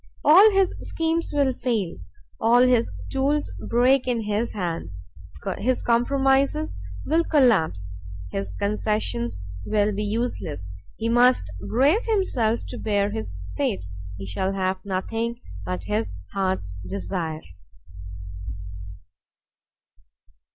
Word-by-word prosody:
All 375 +9 +9
his 390 -2 +3
schemes 330 +1 -1
will 280 -3 +2
fail, 225 -9 -1 0.4
all 240 +2 +5
his 250 -2 +3 0.2
tools 280 +2 0
break 250 +2 +3
in 240 -2 +1
his 210 +2 -1
hands. 165 - -4 0.6
His 255 +3 0
compromises 270 - +2 0.3
will 325 +2 +3
collapse, 205 - +3 0.4
his 100 -1 -3
concessions 200 - -1 0.2
will 210 - +1
be 210 +2 -2
useless. 210 - -2 0.3
He 225 - -1
must 240 - +4 0.2
brace 290 - +3
himself 250 - +1
to - - -6
bear 205 -1 +1
his 95 -4 -5 0.2
fate; 95 +1 -1 0.3
he 95 - -6
shall 190 - -1
have 190 -1 -1
nothing 225 +5 -2 0.3
but 90 0 -3
his 105 +1 -1 0.2
heart's 185 - -1
desire. 100 - -3
215 Hz, 110 wpm, -24 LUFS, 160-255 Hz, 0.6 s, All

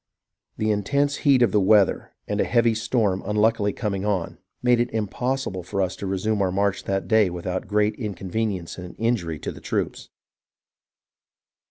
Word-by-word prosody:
The 110 0 +1
intense 140 +8 +1
heat 135 -4 +4
of 120 - +3
the 105 - +3
weather 100 0 +3 0.2
and - - 0
a - - +4
heavy 115 -1 +3
storm 110 -4 0
unluckily 105 0 +2
coming 100 -3 -3
on, 95 -5 -2 0.2
made 125 -1 +4
it 120 0 +1
impos 125 +5 -2
sible 95 -2 -5
for 95 +3 -4
us 95 -1 0
to 100 - -5
resume 100 +2 0
our 95 -1 +1
march 100 +1 0
that 95 0 -1
day 110 -4 +4
without 90 +1 -4
great 105 0 +1
incon 100 -5 -5
venience 100 -6 -2
and 90 0 -9
injury 110 -9 -1
to - - -5
the - - -12
troops. - - -3
105 Hz, 175 wpm, -24 LUFS, 95-115 Hz, 0.2 s, heat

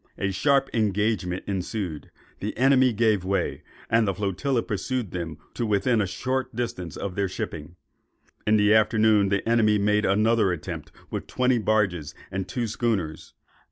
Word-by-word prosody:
A 100 - -1
sharp 140 +7 +2
engagement 105 -4 0
ensued, 95 -5 -4 0.3
the - - -4
enemy 130 0 +5
gave 110 -3 +2
way, 95 +1 -1 0.3
and 115 -1 +3
the 95 - 0
flotilla 110 +6 -1
pursued 110 +1 -3
them 85 -4 -5 0.2
to 120 - -3
within 110 +2 +2
a 100 - 0
short 130 +7 -2
distance 90 -9 -4
of 100 - -4
their 100 0 -1
shipping. 90 -5 -6 0.7
In 110 0 +5
the 105 0 +4
afternoon, 110 -2 +4
the 100 +2 -1
enemy 110 -2 +4
made 105 +1 +2
another 105 0 +3
attempt 85 -3 -6 0.2
with - - -4
twenty 125 -1 +2
barges 95 -9 0 0.2
and 95 -1 -3
two 120 +6 -2
schooners. 105 -8 -2
105 Hz, 155 wpm, -25 LUFS, 95-115 Hz, 0.7 s, enemy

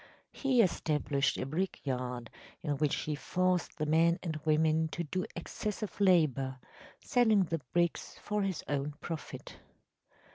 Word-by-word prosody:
He 260 -4 +3
established 150 -5 +1
a - - -2
brick 175 +8 -2
yard, 125 -3 -3 0.3
in 150 -3 0
which 150 0 +2
he 155 - -2
forced 180 +4 0
the 155 - -1
men 165 +2 +4
and 165 -3 -2
women 160 +1 +3
to 170 +2 -4
do 185 +4 -2
excessive 210 +3 -4
labor, 145 -8 +3 0.5
selling 220 -5 +4
the 165 -2 -2
bricks 170 -1 0
for 210 0 -2
his 195 -4 -2
own 145 0 -2
profit. 165 -2 -7
160 Hz, 140 wpm, -32 LUFS, 145-185 Hz, 0.5 s, men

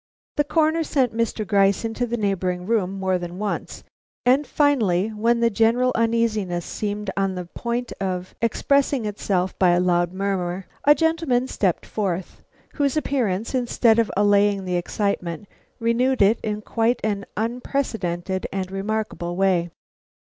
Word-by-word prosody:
The 295 - +4
Coroner 315 +2 +2
sent 260 -7 0
Mr. 230 -1 -1
Gryce 200 +1 +2
into 225 +2 -2
the 240 +1 -2
neighboring 185 -4 -1
room 205 -4 +1
more 190 -1 +1
than 175 0 -6
once, 210 +1 -4 0.4
and 265 +4 +3
finally, 220 - +2
when 230 +2 +1
the 235 0 +3
general 230 +4 +3
uneasiness 220 -6 0
seemed 210 -1 -3
on 195 -1 0
the 180 -1 -5
point 235 +7 -4
of 185 -1 -3
expressing 275 +2 +1
itself 190 -3 -1
by 185 - +5
a 175 - +3
loud 175 -1 +2
murmur, 190 -1 -2 0.2
a 295 +1 +7
gentleman 320 -7 +1
stepped 190 -8 0
forth, 190 -4 -3 0.3
whose 285 0 0
appearance, 230 -8 -1
instead 240 -2 +3
of 230 - +2
allaying 205 -1 +3
the 180 -1 -1
excitement, 180 0 -2 0.3
renewed 240 +1 +2
it 210 +4 +4
in 210 0 -3
quite 230 +3 +1
an 200 -2 -2
unprecedented 215 -6 -2
and 190 -1 -3
remarkable 195 -3 -3
way. 180 -2 +2
210 Hz, 145 wpm, -23 LUFS, 185-235 Hz, 0.4 s, a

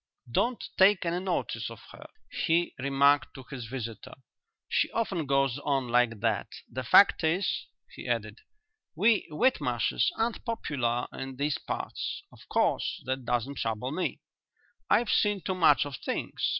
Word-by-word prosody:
"Don't 240 - 0 0.2
take 190 -1 +5
any 170 +1 0
notice 185 -2 -2
of - - -10
her," - - -12 0.2
he 170 +1 +1
remarked 140 +2 +3
to 130 - -9
his 125 -4 -6
visitors, 115 -3 -6 0.5
"she - - +1
often 190 -9 -1
goes 135 -1 +2
on 135 -3 -1
like 120 -3 +2
that. 110 -3 0 0.2
The 130 +2 -5
fact 170 +9 +6
is," 175 +5 0 0.3
he - - -9
added, - - -2 0.6
"we 210 +6 +3
Whitmarshes 250 - +1
aren't 225 0 -1
popular 130 - -1
in 135 0 -6
these 140 +1 -1
parts. - - -4
Of - - -18
course - - 0
that 130 0 -3
doesn't 125 +3 -1
trouble 115 +3 -2
me; 180 +4 -2 0.7
I've 235 -2 +3
seen 205 -1 +2
too 190 - -2
much 155 -7 +4
of 140 -3 -6
things. - - -4
140 Hz, 150 wpm, -29 LUFS, 125-185 Hz, 0.7 s, fact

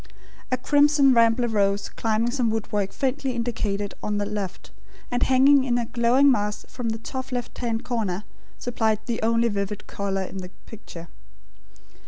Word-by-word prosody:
A 255 - +2
crimson 290 0 +4
rambler 230 +1 +4
rose 200 -2 +1
climbing 225 +1 0
some 245 -3 +1
woodwork 210 -2 -1
faintly 270 0 -1
indicated 210 -4 -2
on 210 -1 -2
the 205 - -1
left, 205 -2 -5 0.4
and 245 - 0
hanging 270 +1 +5
in 245 -2 +1
a 240 - -1
glowing 245 +4 +4
mass 210 -3 -1
from 245 -3 -4
the 220 - -2
top 260 +3 -6
left 245 -1 -4
hand 230 -1 -2
corner, 210 -6 -2 0.3
supplied 220 -3 0
the 235 -2 -2
only 230 +1 +2
vivid 200 -1 -3
colour 195 -1 -2
in 190 - -7
the 180 -1 -6 0.2
picture. 175 -6 -10
230 Hz, 160 wpm, -24 LUFS, 205-250 Hz, 0.4 s, hanging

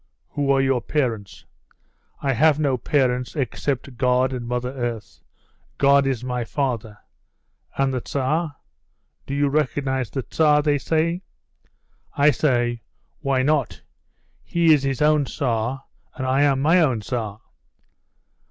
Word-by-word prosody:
'Who 145 -1 -2
are 135 -1 +4
your 135 -2 +1
parents?' 115 -10 -3 0.8
'I 135 -1 +1
have 150 +4 +3
no 140 -4 +1
parents 125 0 0
except 135 -2 -3
God 125 0 +2
and 120 -2 -5
Mother 125 +1 -2
Earth. 120 -4 -5 0.6
God 140 0 +4
is 130 -3 -1
my 125 -1 -2
father.' 115 -5 -3 0.8
'And 135 -1 +1
the 125 - -2
Tsar? 145 +5 -1 0.7
Do 140 - -3
you 145 0 +2
recognise 135 -3 -1
the 135 +2 -4
Tsar?' 150 +1 +3
they 145 -1 +2
say. 165 +4 0 1.0
I 145 +1 +5
say, 120 -3 0 0.4
'Why 135 -3 0
not? 145 -4 0 0.6
He 170 -2 +3
is 145 - +3
his 135 0 -1
own 150 -1 +3
Tsar, 125 -1 -2 0.3
and 130 -4 -4
I 130 +2 +2
am 140 -2 +2
my 170 +4 +5
own 130 -8 +1
Tsar. 110 -2 -4
135 Hz, 135 wpm, -22 LUFS, 125-145 Hz, 1.0 s, I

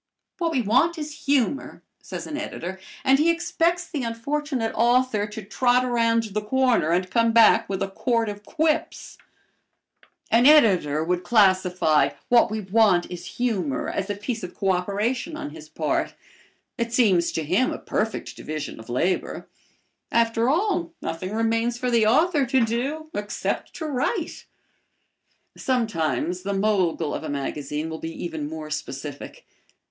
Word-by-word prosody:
"What 340 -2 +1
we 260 -6 +1
want 260 - +2
is 300 -1 -7
humor," 275 -1 0 0.2
says - - -7
an 305 - -5
editor, 190 - -5 0.2
and 270 +1 +4
he 320 +3 +4
expects 340 +1 0
the 295 -5 -4
unfortunate 245 +1 -2
author 240 -3 +2
to 215 +1 -8
trot 245 +5 +2
around 230 -2 +2
the 215 - 0
corner 250 -5 +2
and 180 +2 +1
come 230 +3 +2
back 230 -1 +5
with 195 -1 -1
a - - -1
quart 230 +3 0
of 205 0 -6
quips. 315 +6 -2 1.1
An 240 +3 +5
editor 185 - +5
would 180 +2 -1
classify 185 -7 +3 0.2
"What 240 -1 +5
we 215 0 -3
want 195 -3 +3
is 180 - -7
humor" 195 - -1
as 195 +1 -3
a 205 - -1
piece 220 +3 -4
of 180 -2 -8
coöperation 205 - -1
on 145 - -6
his 155 0 -12
part. 155 0 -1 0.6
It 235 0 -1
seems 195 -8 +3
to 160 - -1
him 185 - +1
a - - -4
perfect 220 +1 -3
division 155 -4 -6
of 110 - -12
labor. 170 +10 -1 0.6
After 230 +1 +2
all, 345 +1 0
nothing 165 +4 -4
remains 230 +2 0
for 250 0 -1
the 230 -2 +4
author 295 +3 +3
to 260 -1 +3
do 280 +8 -3
except 205 0 -3
to 320 - -5
write. 305 - -2 1.1
Sometimes 180 -8 -1
the 200 +2 -3
mogul 190 -6 +1
of - - -4
a - - -5
magazine 145 +2 -3
will 160 0 -6
be 165 0 -6
even 160 -3 -4
more 155 -1 -7
specific. 145 -1 -6
225 Hz, 150 wpm, -24 LUFS, 180-255 Hz, 1.1 s, back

